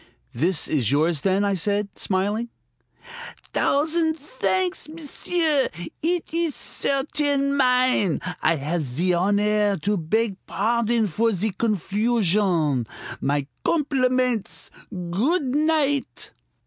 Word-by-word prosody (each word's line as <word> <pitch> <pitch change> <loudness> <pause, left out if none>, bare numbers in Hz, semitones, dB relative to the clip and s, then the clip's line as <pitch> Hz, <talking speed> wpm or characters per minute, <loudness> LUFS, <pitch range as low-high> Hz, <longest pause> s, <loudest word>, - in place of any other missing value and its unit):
"This 165 +8 +1
is 130 -7 +1
yours, 155 +1 +2
then?" 195 +1 +1
I 200 - +1
said, 200 +3 -2
smiling. 205 +5 0 1.0
"Thousand 320 +2 +1
thanks, 190 - -2
m'sieu! 315 -1 -1 0.3
Eet 340 0 -1
ees 335 -3 0
certain 280 0 0
mine. 250 - +2 0.2
I 165 - +3
have 155 +4 -2
zee 155 +7 -1
honaire 205 +3 +2
to 205 +5 0
beg 200 +5 0
pardon 230 +1 +1
for 225 +5 +1
zee 210 +2 -1
confusion. 195 - +1 0.3
My 140 0 0 0.2
compliments! 255 - 0 0.2
Good 205 - -1
night!" 295 -2 0
210 Hz, 100 wpm, -23 LUFS, 180-275 Hz, 1.0 s, I